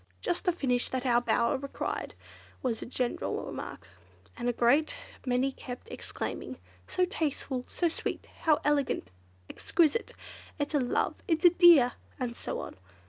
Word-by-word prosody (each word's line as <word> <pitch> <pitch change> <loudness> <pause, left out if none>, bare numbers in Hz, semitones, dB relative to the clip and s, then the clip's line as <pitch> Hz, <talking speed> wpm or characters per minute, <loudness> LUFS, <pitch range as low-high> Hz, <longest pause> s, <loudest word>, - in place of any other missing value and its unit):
"Just 350 - -2
the 360 - +4
finish 255 -7 0
that 260 0 -2
our 240 -1 +4
bower 235 0 +2
required," 275 0 -4 0.5
was 235 -4 -1
a - - -5
general 245 0 -2
remark, - - -7 0.5
and 245 0 -1
a - - +4
great 245 +6 +3 0.3
many 255 +2 +2
kept 250 - -8
exclaiming, - - -5 0.3
"So 365 - +2
tasteful!" 285 -7 -2
"So 345 - 0
sweet!" 330 - -3
"How 310 -2 +3
elegant!" 285 - +1 0.4
"Exquisite!" 335 +7 +1 0.4
"It's 290 0 -2
a 295 - +4
love!" 245 -2 +1
"It's 325 0 +1
a 350 - +10
dear!" 340 -8 +7 0.3
and 245 -2 -2
so - - -4
on. - - -8
275 Hz, 150 wpm, -30 LUFS, 245-320 Hz, 0.5 s, a